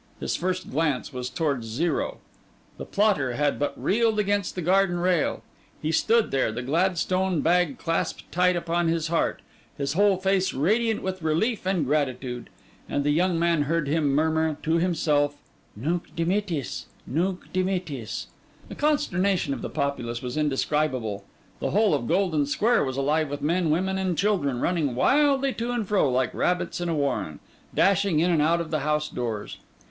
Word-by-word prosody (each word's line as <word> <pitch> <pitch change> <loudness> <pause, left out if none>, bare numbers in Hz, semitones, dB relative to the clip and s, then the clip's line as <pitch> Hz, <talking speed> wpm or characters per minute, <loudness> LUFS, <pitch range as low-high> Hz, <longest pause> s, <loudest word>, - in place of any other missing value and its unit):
His - - -2
first 185 0 -2
glance 145 -2 -1
was 125 0 -4
towards 140 -8 -1
Zero. 150 +8 -1 0.6
The - - -6
plotter 195 - +1
had 145 +2 0
but 145 - -2
reeled 220 +1 +2
against 205 -2 0
the 180 - -3
garden 185 +1 +3
rail; 180 -2 +1 0.4
he 155 - -2
stood 225 +7 +2
there, 135 -4 +1
the 120 +3 -5
Gladstone 180 +3 +1
bag 180 +9 +2
clasped 165 -5 -2
tight 180 +1 +3
upon 170 0 0
his 165 -1 0
heart, 170 - 0 0.3
his 140 0 -1
whole 200 +2 +4
face 190 0 +1
radiant 215 - +1
with 185 -1 -3
relief 185 +7 0
and 185 -6 +1
gratitude; 130 -4 -2 0.4
and 145 - 0
the 145 - +2
young 175 +3 +2
man 170 -2 +2
heard 155 +1 0
him 150 +1 +1
murmur 160 +1 +1
to 165 +1 +2
himself: 150 -4 +1 0.4
'Nunc 165 +11 -3
dimittis, 170 -4 -2 0.2
nunc 180 +6 -2
dimittis!' 180 - -2 0.4
The - - -7
consternation 200 - +1
of - - -6
the - - -4
populace 120 -4 -3
was 125 0 -4
indescribable; 135 -8 -1 0.3
the - - -1
whole 210 -3 +3
of 135 -5 -1
Golden 170 -5 +1
Square 225 +9 +2
was 130 0 -4
alive 150 +2 +1
with 145 0 -5
men, 170 +2 +1
women, 190 +5 0
and 185 -3 -1
children, 165 -12 +1
running 155 -8 0
wildly 275 - +3
to 235 +1 -3
and 240 -4 -2
fro, 205 -4 +3
and 125 - 0
like 130 -3 +1
rabbits 180 0 -1
in 175 - -1
a 165 - 0
warren, 135 - -1 0.4
dashing 195 -4 +3
in 175 +3 +3
and 160 -3 +3
out 165 +3 +3
of 165 - -6
the 155 - +1
house 150 +1 0
doors. 115 -6 -4
165 Hz, 170 wpm, -25 LUFS, 145-185 Hz, 0.6 s, whole